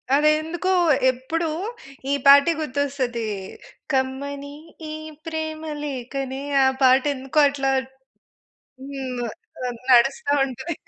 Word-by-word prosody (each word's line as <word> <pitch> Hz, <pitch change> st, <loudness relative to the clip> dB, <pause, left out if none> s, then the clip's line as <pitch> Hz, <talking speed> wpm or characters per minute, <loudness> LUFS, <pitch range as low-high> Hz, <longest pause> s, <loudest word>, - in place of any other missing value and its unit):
అదెందుకో, 310 Hz, +5 st, +2 dB, 0.4 s
ఎప్పుడు 290 Hz, +7 st, -3 dB, 0.6 s
ఈ -, -, +3 dB
పాటే 280 Hz, +3 st, +8 dB
గుర్తొస్తది, 270 Hz, -5 st, -2 dB, 0.7 s
కమ్మని 280 Hz, +2 st, -2 dB, 0.4 s
ఈ -, -, -5 dB, 0.3 s
ప్రేమలేఖనే, 295 Hz, -5 st, -4 dB, 0.2 s
ఆ -, -, +5 dB, 0.2 s
పాట 260 Hz, 0 st, +6 dB
ఎందుకో, 270 Hz, +3 st, -1 dB
అట్లా 270 Hz, -1 st, -1 dB, 1.2 s
హ్మ్. 255 Hz, -3 st, -4 dB, 0.4 s
ఆహ్, 245 Hz, -1 st, -4 dB, 0.2 s
నడుస్తా 270 Hz, +3 st, +4 dB
ఉంటది. 275 Hz, +6 st, -5 dB
275 Hz, 90 wpm, -23 LUFS, 260-305 Hz, 1.2 s, పాటే